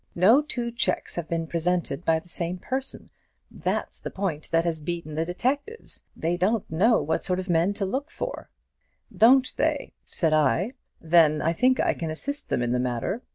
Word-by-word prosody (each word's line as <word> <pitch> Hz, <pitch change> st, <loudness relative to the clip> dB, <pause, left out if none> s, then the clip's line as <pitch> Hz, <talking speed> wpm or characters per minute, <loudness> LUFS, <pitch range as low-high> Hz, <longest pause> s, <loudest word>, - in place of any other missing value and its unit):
No 215 Hz, +11 st, +6 dB
two 240 Hz, -5 st, -4 dB
cheques 235 Hz, -, -1 dB
have 170 Hz, -2 st, -4 dB
been 165 Hz, -1 st, -1 dB
presented 170 Hz, -1 st, -1 dB
by 165 Hz, -2 st, +3 dB
the 160 Hz, -, -9 dB
same 175 Hz, +1 st, -2 dB
person, 260 Hz, +8 st, -4 dB, 0.4 s
that's -, -, -3 dB
the -, -, -5 dB
point 180 Hz, -6 st, -3 dB
that 165 Hz, +1 st, +2 dB
has 165 Hz, -2 st, -1 dB
beaten 160 Hz, 0 st, -5 dB
the 160 Hz, +2 st, -1 dB
detectives; 280 Hz, -, -3 dB, 0.2 s
they 170 Hz, +2 st, 0 dB
don't 205 Hz, +4 st, +1 dB
know 215 Hz, +8 st, +4 dB
what 160 Hz, -, -1 dB
sort 180 Hz, 0 st, +1 dB
of 185 Hz, 0 st, -6 dB
men 175 Hz, +4 st, +2 dB
to 200 Hz, -, -1 dB
look 270 Hz, +10 st, -3 dB
for.' -, -, -6 dB, 0.7 s
'Don't 255 Hz, +3 st, +5 dB
they?' -, -, 0 dB
said 160 Hz, -4 st, 0 dB
I; 155 Hz, -, +2 dB, 0.3 s
'then 160 Hz, -2 st, +4 dB
I 165 Hz, -, +2 dB
think 255 Hz, +8 st, +3 dB
I -, -, +2 dB
can 165 Hz, -, -4 dB
assist 285 Hz, -, -4 dB
them 120 Hz, -, 0 dB
in 120 Hz, -, -1 dB
the 125 Hz, -, +1 dB
matter.' 125 Hz, -, -2 dB
175 Hz, 190 wpm, -26 LUFS, 160-230 Hz, 0.7 s, No